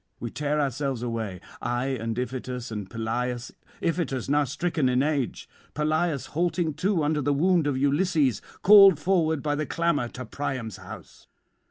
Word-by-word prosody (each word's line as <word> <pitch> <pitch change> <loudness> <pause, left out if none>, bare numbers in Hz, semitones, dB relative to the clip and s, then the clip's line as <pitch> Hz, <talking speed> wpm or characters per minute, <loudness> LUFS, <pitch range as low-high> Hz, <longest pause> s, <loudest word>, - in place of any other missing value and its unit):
We 120 - -5
tear 150 0 -1
ourselves 135 -3 -1
away, 110 -6 -4 0.2
I 120 +1 -1
and 115 -3 -3
Iphitus 125 -1 -4
and 105 -3 -5
Pelias, 120 +2 -3 0.3
Iphitus 145 -7 -1
now 145 0 +3
stricken 155 0 0
in 125 +1 +2
age, 145 -5 -1 0.3
Pelias 155 -1 0
halting 170 0 0
too 180 +2 0
under 150 0 +1
the 145 +1 +1
wound 170 +1 +3
of 140 -3 0
Ulysses, 145 - +2 0.2
called 195 -3 +9
forward 160 -2 +1
by 150 -1 0
the 150 +1 -2
clamour 170 -7 0
to 130 +1 -8
Priam's 125 -4 -4
house. - - -12
145 Hz, 155 wpm, -26 LUFS, 125-160 Hz, 0.3 s, called